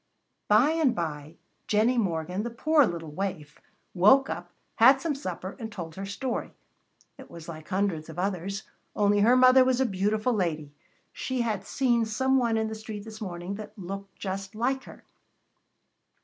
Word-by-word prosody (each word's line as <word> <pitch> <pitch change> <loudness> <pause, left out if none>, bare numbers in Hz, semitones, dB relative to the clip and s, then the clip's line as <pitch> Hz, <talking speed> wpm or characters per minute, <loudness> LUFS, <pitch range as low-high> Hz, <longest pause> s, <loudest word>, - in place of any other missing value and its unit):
By 230 +8 +5
and 320 -6 +2
by, 155 -2 -4 0.3
Jennie 225 +4 +3
Morgan, 180 -1 -1
the 235 - -3
poor 295 +3 +3
little 165 -4 -5
waif, 155 -4 -5 0.3
woke 210 +10 +5
up, - - -6 0.3
had 260 +4 +7
some 320 +1 -1
supper, 185 -7 -6
and 225 -2 -6
told 170 -5 -7
her 195 +3 -6
story. 245 +5 -4 0.6
It - - -12
was 165 -1 -11
like 155 -2 -9
hundreds 185 -5 -1
of 160 - -9
others, 195 +1 -2 0.3
only 205 0 +3
her 235 +5 +5
mother 255 +1 +7
was 255 -1 +1
a 265 - +3
beautiful 215 +3 0
lady. 155 -8 -2 0.4
She 260 -2 -2
had 210 -4 -2
seen 240 -4 +2
some 265 +5 +1
one 230 -2 +1
in 220 - +1
the 220 - -5
street 215 -1 -7
this 220 0 -10
morning 180 -1 -5
that 215 +1 -10
looked 195 +1 -7
just 195 +1 -5
like 265 +4 -1
her. - - -13
205 Hz, 170 wpm, -27 LUFS, 180-240 Hz, 0.6 s, had